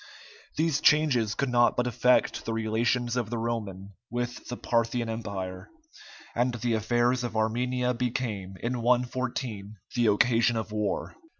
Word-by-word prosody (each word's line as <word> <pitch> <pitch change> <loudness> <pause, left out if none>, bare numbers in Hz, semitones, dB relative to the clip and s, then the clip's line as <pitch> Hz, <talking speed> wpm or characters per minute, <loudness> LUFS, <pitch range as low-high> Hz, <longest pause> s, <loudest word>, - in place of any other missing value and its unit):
These 155 -2 +1
changes 130 -8 +3
could 140 - 0
not 120 -1 +3
but 125 - +2
affect 125 +1 +2
the 115 - -2
relations 115 +2 0
of 120 -4 -1
the 120 - -2
Roman 105 -4 -4 0.2
with 120 0 -4
the 125 - -4
Parthian 115 0 0
empire, 100 -5 -5 0.6
and 120 +1 +1
the 120 0 -1
affairs 120 +3 +1
of 120 -2 -3
Armenia 125 +3 0
became, 115 -6 -3
in 120 0 -1
114, 120 -3 -1 0.2
the 120 -2 +3
occasion 115 +3 +3
of 110 -1 -4
war. 105 -2 -2
120 Hz, 140 wpm, -28 LUFS, 110-125 Hz, 0.6 s, changes